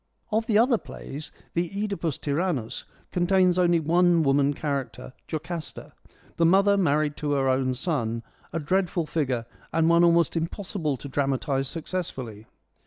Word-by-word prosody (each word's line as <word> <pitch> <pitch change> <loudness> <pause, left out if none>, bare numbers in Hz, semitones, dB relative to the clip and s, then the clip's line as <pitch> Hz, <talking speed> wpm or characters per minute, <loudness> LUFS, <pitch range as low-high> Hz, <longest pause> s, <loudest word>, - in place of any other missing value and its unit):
Of 220 +1 +1
the 215 - +3
other 235 0 +4
plays, 145 +3 -8 0.2
the 170 0 0
CEdipus 200 -7 -2
Tyrannus 145 -5 -2 0.3
contains 180 0 +3
only 175 -1 +4
one 170 +1 +3
woman 140 0 +3
character 140 -3 -4
— - - -45
Jocasta; 160 +1 -5 0.4
the 170 - +2
mother 200 +3 +5
married 150 -5 +1
to 145 -1 -1
her 135 -1 +1
own 130 -1 +1
son, 115 -7 -2 0.3
a 165 - -2
dreadful 175 +1 0
figure, 135 -7 -1 0.3
and 165 0 +2
one 170 0 +5
almost 170 0 +4
impossible 165 -3 -2
to 140 - -8
dramatise 135 0 0
successfully. 135 - -5
160 Hz, 145 wpm, -26 LUFS, 140-180 Hz, 0.4 s, mother